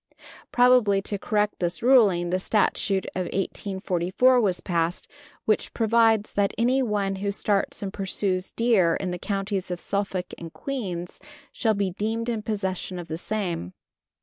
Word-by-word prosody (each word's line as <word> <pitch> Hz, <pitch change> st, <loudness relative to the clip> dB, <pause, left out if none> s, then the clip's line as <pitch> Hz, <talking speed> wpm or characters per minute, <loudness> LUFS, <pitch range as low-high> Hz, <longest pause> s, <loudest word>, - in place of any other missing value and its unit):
Probably 245 Hz, -5 st, +5 dB
to 200 Hz, -1 st, -3 dB
correct 210 Hz, 0 st, 0 dB
this 175 Hz, +4 st, -2 dB
ruling, 200 Hz, -9 st, +4 dB
the 185 Hz, -, +1 dB
Statute 195 Hz, -1 st, +1 dB
of 185 Hz, -1 st, -2 dB
1844 190 Hz, +5 st, +1 dB
was 185 Hz, -5 st, +1 dB
passed, 170 Hz, -1 st, -1 dB, 0.4 s
which 215 Hz, -, 0 dB
provides 225 Hz, -1 st, +3 dB
that 200 Hz, -1 st, +1 dB
anyone 220 Hz, -5 st, +1 dB
who 200 Hz, +1 st, -2 dB
starts 200 Hz, 0 st, 0 dB
and 195 Hz, 0 st, -4 dB
pursues 190 Hz, -1 st, -1 dB
deer 215 Hz, -8 st, +3 dB
in 185 Hz, -2 st, -3 dB
the 180 Hz, -, -4 dB
Counties 195 Hz, -1 st, -2 dB
of 180 Hz, -1 st, -3 dB
Suffolk 195 Hz, -2 st, -3 dB
and 165 Hz, -1 st, -8 dB
Queens 185 Hz, -, -5 dB, 0.3 s
shall 220 Hz, -2 st, +1 dB
be 200 Hz, -2 st, 0 dB
deemed 225 Hz, +5 st, -2 dB
in 225 Hz, -2 st, -1 dB
possession 190 Hz, -4 st, -3 dB
of 175 Hz, -1 st, -7 dB
the 160 Hz, -, -3 dB
same. 175 Hz, -, -3 dB
200 Hz, 150 wpm, -25 LUFS, 185-220 Hz, 0.4 s, Probably